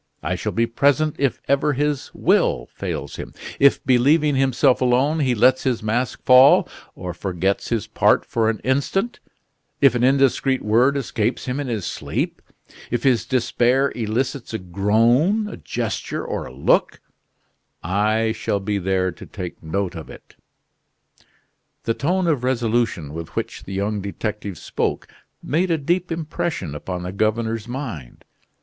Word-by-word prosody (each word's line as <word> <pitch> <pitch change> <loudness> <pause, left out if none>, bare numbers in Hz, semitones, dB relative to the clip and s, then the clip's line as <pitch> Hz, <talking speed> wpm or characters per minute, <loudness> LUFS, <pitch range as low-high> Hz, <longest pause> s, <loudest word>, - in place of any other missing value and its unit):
I - - -1
shall - - -3
be 115 - +1
present 145 +5 +2
if 140 -2 0
ever 140 +1 +2
his 145 0 -1
will - - +2
fails - - -5
him, - - -8 0.2
if, 140 0 +4
believing 145 +4 +4
himself 130 0 +3
alone, 130 +5 +2
he 130 -4 +1
lets 130 +4 +4
his 125 -4 -1
mask 115 +3 -1
fall, 130 +2 +7 0.3
or 90 -1 -6
forgets 95 +2 -2
his 115 -4 -1
part - - +2
for 110 -1 +1
an 115 - -1
instant, 140 - 0 0.6
if 140 -4 +5
an 120 0 0
indiscreet 135 0 +2
word 120 +6 +3
escapes 115 -3 -2
him 130 +2 -2
in 145 - -3
his 110 -7 -3
sleep, - - -3 0.5
if 120 - -2
his 130 -4 +2
despair 130 +1 +2
elicits 120 +2 -2
a - - +1
groan, 115 - +2
a - - -7
gesture, - - -4
or - - -4
a - - -10
look 65 +3 +1 0.8
I 110 +5 +1
shall 110 -2 -2
be 100 +1 -2
there 95 0 0
to 85 - -12
take 90 -4 -7
note 95 +4 -2
of 80 -3 -8
it." - - -14 1.5
The 115 - 0
tone 180 +9 0
of 150 -7 +1
resolution 115 - 0
with 85 0 -7
which - - -4
the 95 - -7
young 100 +2 -1
detective 100 -1 -4
spoke - - -3 0.4
made 175 +6 0
a 165 - +2
deep 175 +5 -1
impression 155 - -3
upon 90 +4 -5
the 90 - -4
governor's 110 +2 -1
mind. 115 - -7
120 Hz, 155 wpm, -22 LUFS, 105-140 Hz, 1.5 s, fall